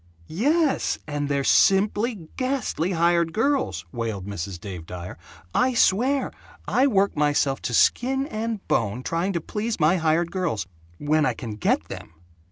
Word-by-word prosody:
"Yes, 290 - +1
and 145 -1 -3
they're 140 -1 0
simply 205 - +2
GHASTLY 255 - -1
hired 170 -1 +2
girls!" 225 - 0
wailed 110 -5 -4
Mrs. 95 -2 -5
Dave 90 -4 -8
Dyer. 90 0 -7 0.4
"I 255 -1 +2
swear, 255 +7 +2 0.4
I 260 +3 +3
work 200 -5 +2
myself 145 -2 +1
to 125 - -3
skin 265 - +2
and 220 -5 -4
bone 115 +3 0
trying 170 +6 -1
to 170 - -1
please 215 +5 -3
my 160 +4 +4
hired 165 +1 +1
girls 175 - -2 0.3
when 155 +1 +1
I - - +1
can 115 -3 -6
get 105 -1 0
them! 80 - -10
170 Hz, 150 wpm, -24 LUFS, -, 0.4 s, my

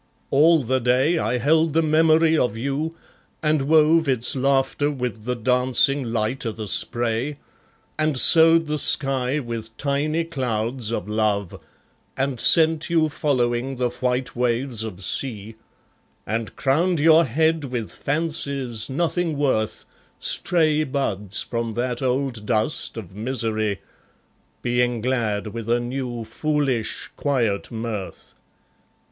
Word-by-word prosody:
All 155 +2 +4
the 130 +2 0
day 130 +7 +2
I 125 - 0
held 155 +5 +2
the 165 +1 +2
memory 160 +1 +3
of 125 -7 0
you, 140 +6 -3 0.5
and 155 -1 +2
wove 160 0 +4
Its 125 -1 +4
laughter 135 +2 +1
with 125 -6 -5
the 125 0 -1
dancing 125 +3 +2
light 115 +2 -2
o' 115 - -2
the 110 -1 -7
spray, 120 - 0 0.6
And 155 -3 +1
sowed 165 +5 +5
the 150 0 -2
sky 135 -1 +2
with 115 -4 -6
tiny 150 +3 -1
clouds 125 -6 -2
of 115 -4 -3
love, 105 -3 -1 0.6
And 135 -2 -2
sent 160 +2 +4
you 160 -2 +2
following 130 -3 -1
the 125 -1 -1
white 125 +1 -2
waves 120 -1 0
of 100 -4 -7
sea, 110 -1 -2 0.7
And 110 -1 -4
crowned 165 +5 +1
your 160 +2 +5
head 160 +4 +1
with 120 -4 -4
fancies, 140 -7 -3
nothing 165 +2 -1
worth, 130 -7 -1 0.3
Stray 155 -3 +2
buds 105 -9 -2
from 115 -1 -3
that 120 +2 -2
old 130 -4 -1
dust 110 +3 0
of 95 -4 -9
misery, 110 -3 -1 0.8
Being 120 0 0
glad 110 -4 -1
with 115 -1 -6
a 120 +1 +2
new 120 -1 -4
foolish 135 -1 -2
quiet 120 -8 -1
mirth. 110 -4 -6
130 Hz, 130 wpm, -22 LUFS, 115-150 Hz, 0.8 s, sowed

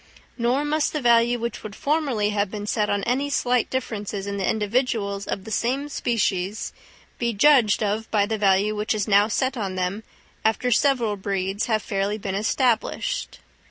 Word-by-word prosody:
Nor 250 +4 +1
must 300 0 0
the 305 - -1
value 235 0 +4
which 235 0 -4
would 210 -2 -8
formerly 280 -9 0
have 205 -1 0
been 205 0 -5
set 210 0 0
on 200 -1 0
any 270 +4 0
slight 250 -4 +1
differences 210 -6 -3
in 200 0 -3
the 190 - 0
individuals 210 -2 -1
of 195 - -3
the 220 - -9
same 260 +7 -1
species, 210 -6 -1 0.5
be 235 -1 0
judged 230 -2 +4
of 215 +2 -1
by 205 -2 +2
the 220 +1 -3
value 200 +1 +3
which 210 +1 -1
is 210 -1 -1
now 205 0 +5
set 260 +5 0
on 195 -5 -3
them, 185 +3 -2 0.4
after 225 +3 +1
several 235 -4 +2
breeds 195 +1 -2
have 220 -2 0
fairly 200 +1 -1
been 195 -2 -4
established. 245 - -1
215 Hz, 175 wpm, -24 LUFS, 200-245 Hz, 0.5 s, now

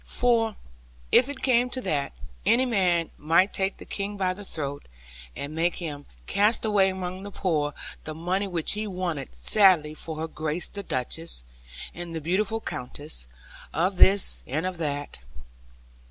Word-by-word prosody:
For, 230 -3 +2 0.6
if 255 +3 +6
it 285 -2 -6
came 250 -1 +4
to 255 +1 -1
that, 145 - -1 0.3
any 255 +2 +4
man 180 -8 +2
might 165 +6 +4
take 190 0 0
the - - -10
King 200 0 -4
by 185 -2 +1
the 205 +2 -10
throat, 145 -6 -5 0.5
and 145 +2 -5
make 170 +2 +1
him 145 -5 -6 0.2
cast 210 - +2
away 205 -3 +4
among 185 0 -4
the 200 - -6
poor 155 -7 0 0.3
the 155 - -5
money 185 +5 0
which 170 -4 -1
he 210 +1 0
wanted 175 - -3
sadly 160 - +5
for 160 +1 -6
Her 160 +1 -2
Grace 155 +1 -3
the 200 - -6
Duchess, 160 - -3 0.5
and 170 -1 -6
the - - -1
beautiful 195 +7 0
Countess, 125 - -6 0.5
of 180 +5 +1
this, 195 +2 +5
and 155 +6 -1
of 185 -2 -3
that. 145 - -3
180 Hz, 160 wpm, -27 LUFS, 155-200 Hz, 0.6 s, if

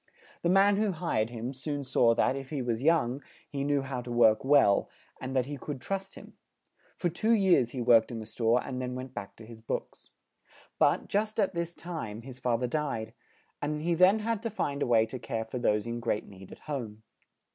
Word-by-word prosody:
The 170 - +1
man 195 +2 +5
who 210 -2 +1
hired 155 -10 -1
him, 120 +2 -5
soon 145 +2 -4
saw 120 -3 +3
that, 130 - +2
if 135 -1 -6
he 145 -4 -3
was 120 -1 -1
young, 140 -4 +2 0.3
he 140 -1 -3
knew 140 -1 +1
how 130 -2 -4
to 120 0 -8
work 110 -2 +4
well, 135 -8 +4 0.3
and 130 +1 -4
that 130 -2 +2
he 145 +1 -6
could 140 +1 -6
trust 195 +7 -4
him; - - -12 0.6
for 175 - 0
two 215 +7 +1
years 190 - +4
he 125 0 -5
worked 115 -2 +5
in 120 - -5
the 110 - -6
store 115 +2 +1
and 130 -1 -4
then 125 0 -3
went 130 0 -7
back 100 - -7
to 110 - -13
his 115 0 -12
books. 115 - -5 0.7
But, - - +3
just 215 +2 -1
at 195 -2 +2
this 170 0 -3
time, 115 -11 -6
his 130 0 -10
fa 125 -2 +1
ther 125 - -1
died; 120 -5 -2 0.5
and 150 +1 -2
he 170 +1 +1
then 185 +5 +5
had 220 0 -2
to 230 - -2
find 145 -9 -2
a - - +1
way 115 -2 +4
to 125 +3 -7
care 115 -1 -3
for 125 +3 -5
those 105 -3 +1
in 120 0 -3
great 115 -2 -1
need 95 -1 -13
at - - -11
home. 115 -8 -5
130 Hz, 220 wpm, -29 LUFS, 115-165 Hz, 0.7 s, man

